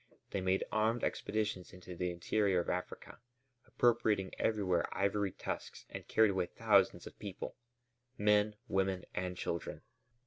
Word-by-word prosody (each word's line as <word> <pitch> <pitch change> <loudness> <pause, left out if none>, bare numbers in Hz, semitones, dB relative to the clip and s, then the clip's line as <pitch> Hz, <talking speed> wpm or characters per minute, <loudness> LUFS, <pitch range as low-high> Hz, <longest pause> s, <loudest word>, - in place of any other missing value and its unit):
They 100 - -1
made 95 +1 +2
armed 110 +2 +2
expeditions 105 -4 -1
into 90 -1 -9
the 90 +1 -1
interior 95 +2 +1
of - - -2
Africa, 90 0 -5 0.5
appropriating 110 -5 +2
everywhere 95 -6 +2
ivory 100 0 +1
tusks, - - -5
and - - -7
carried 110 -2 +5
away 95 -2 0
thousands - - +3
of - - -11
people: 100 -3 -6 0.6
men, 105 0 +3
women, 95 -1 0
and 90 -1 -2
children. 85 - -3
95 Hz, 135 wpm, -34 LUFS, 90-105 Hz, 0.6 s, carried